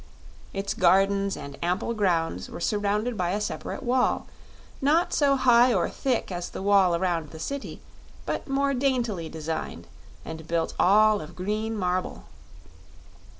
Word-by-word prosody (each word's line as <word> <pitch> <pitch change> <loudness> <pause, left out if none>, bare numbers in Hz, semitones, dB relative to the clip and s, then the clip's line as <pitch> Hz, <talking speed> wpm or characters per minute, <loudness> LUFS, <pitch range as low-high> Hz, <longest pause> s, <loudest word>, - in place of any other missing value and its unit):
Its 195 0 -3
gardens 195 +2 +3
and 140 -1 -9
ample 180 +7 -1
grounds 165 - 0
were - - -8
surrounded 210 +5 0
by 180 -3 -1
a 205 - 0
separate 240 +5 -4
wall, 250 0 +1 0.6
not 310 +6 +2
so 280 -2 +3
high 250 -1 +5
or 185 -6 +2
thick 255 -7 -2
as 175 -1 -4
the - - -7
wall 195 -3 +4
around 170 -3 -1
the 160 - -10
City, 275 - -5 0.4
but - - -3
more 275 0 +1
daintily 245 - -1
designed 160 0 -5 0.4
and 160 0 -8
built 165 -1 -1
all 210 +2 +5
of 155 +3 -10
green 215 +4 -2
marble. 180 -1 -2
200 Hz, 145 wpm, -26 LUFS, 175-240 Hz, 0.6 s, high